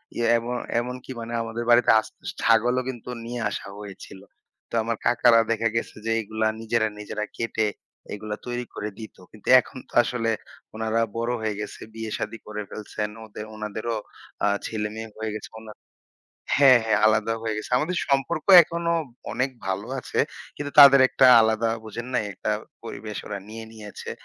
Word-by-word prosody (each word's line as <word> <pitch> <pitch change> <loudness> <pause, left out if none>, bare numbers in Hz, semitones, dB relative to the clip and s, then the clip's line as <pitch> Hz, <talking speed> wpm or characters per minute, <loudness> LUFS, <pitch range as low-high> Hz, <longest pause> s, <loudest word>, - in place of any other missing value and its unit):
এইয়ে 120 -1 0
এমন 120 +1 -3 0.2
এমনকি 125 +2 -6
মানে 115 +1 -6
আমাদের 115 +1 -4
বাড়িতে 120 +1 +6
আস্ত - - -9 0.2
ছাগলও 120 +3 +3
কিন্তু 125 -1 -7 0.2
নিয়ে 120 0 -4
আসা 100 - -5
হয়েছিল। 95 -1 -10 0.5
তো - - -22
আমার 115 -1 -2
কাকারা 120 -1 +5
দেখা 115 0 +1
গেছে 115 - -2
যে, 115 - 0
এগুলা 110 +1 -1
নিজেরা, 115 0 +1
নিজেরা 105 0 -4
কেটে 110 -2 0 0.5
এগুলা 105 0 -5
তৈরি 120 0 -3
করে 105 - -4
দিত। 110 - -9 0.2
কিন্তু 110 - -17
এখন 130 - -8
তো - - -21
আসলে 115 -1 -1 0.4
ওনারা 110 +1 0 0.2
বড় 115 +1 -1
হয়ে 105 -2 -2
গেছে। 105 - -6
বিয়ে 110 -1 -5
শাদি 115 - -4
করে 105 0 -5
ফেলছেন। 105 0 -5
এন - - -11
ওদের 105 0 -8
উনাদেরও 110 +2 -4 0.5
আ - - +4 0.2
ছেলে-মেয়ে 110 0 -4
হয়ে 110 -1 -3
গেছে। 105 - -7
অন্যান্য 110 -1 -12 0.7
হ্যাঁ, 135 -3 +7
হ্যাঁ, 110 -2 +2
আলাদা 110 +1 +2
হয়ে 110 -1 -1
গেছে। 110 - -6
আমাদের 170 +6 -1
সম্পর্ক 140 +4 0 0.2
এখনো 170 +1 -2 0.4
অনেক 130 +2 0 0.2
ভালো 95 -1 -2
আছে। - - -5 0.4
কিন্তু 145 -1 -4
তাদের 140 -1 +10
একটা 130 - +4
আলাদা, 110 +1 +2
বোঝেন 115 +3 -6
নাই? 125 - +2
একটা - - -3 0.3
পরিবেশ 110 -2 -7
ওরা 100 - -4
নিয়ে 110 +1 -7
নিয়েছে। 105 -2 -9
115 Hz, 170 wpm, -25 LUFS, 110-120 Hz, 0.7 s, তাদের